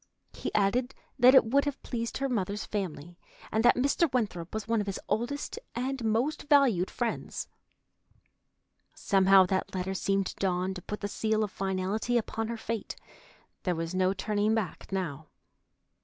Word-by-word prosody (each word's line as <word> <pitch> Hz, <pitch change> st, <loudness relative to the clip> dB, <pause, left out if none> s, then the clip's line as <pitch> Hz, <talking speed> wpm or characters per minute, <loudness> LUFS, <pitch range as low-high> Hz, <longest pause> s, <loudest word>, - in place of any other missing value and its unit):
He -, -, -4 dB
added 240 Hz, +6 st, +1 dB, 0.2 s
that 255 Hz, +2 st, +8 dB
it 265 Hz, -, +8 dB
would 275 Hz, +6 st, +2 dB
have 285 Hz, -2 st, -3 dB
pleased 230 Hz, -2 st, -3 dB
her 275 Hz, -, -1 dB
mother's 210 Hz, -4 st, -2 dB
family, 175 Hz, -4 st, -5 dB, 0.3 s
and 220 Hz, +1 st, +1 dB
that 240 Hz, -, +6 dB
Mr. 280 Hz, +4 st, +2 dB
Winthrop 200 Hz, -9 st, -2 dB
was 220 Hz, -1 st, -4 dB
one 225 Hz, -1 st, +2 dB
of 205 Hz, -, -5 dB
his 195 Hz, -, -3 dB
oldest 285 Hz, -, -2 dB, 0.2 s
and 260 Hz, +1 st, -2 dB
most 240 Hz, +8 st, 0 dB
valued 255 Hz, -, +4 dB
friends. 240 Hz, -2 st, -3 dB, 1.5 s
Somehow 195 Hz, -1 st, +5 dB
that 190 Hz, +1 st, -2 dB
letter 185 Hz, +1 st, -2 dB
seemed 195 Hz, 0 st, 0 dB
to -, -, -5 dB
Dawn 185 Hz, 0 st, 0 dB
to 185 Hz, -, -7 dB
put 210 Hz, +4 st, -6 dB
the 205 Hz, -, -1 dB
seal 220 Hz, +1 st, 0 dB
of 205 Hz, -, -3 dB
finality 195 Hz, +5 st, -1 dB
upon 225 Hz, -1 st, -2 dB
her 235 Hz, 0 st, -4 dB
fate. 225 Hz, -1 st, -4 dB, 0.7 s
There 180 Hz, -2 st, 0 dB
was 165 Hz, +1 st, -3 dB
no 185 Hz, 0 st, +2 dB
turning 210 Hz, +2 st, 0 dB
back 210 Hz, -4 st, -4 dB
now. 160 Hz, -6 st, -3 dB
210 Hz, 165 wpm, -29 LUFS, 190-240 Hz, 1.5 s, that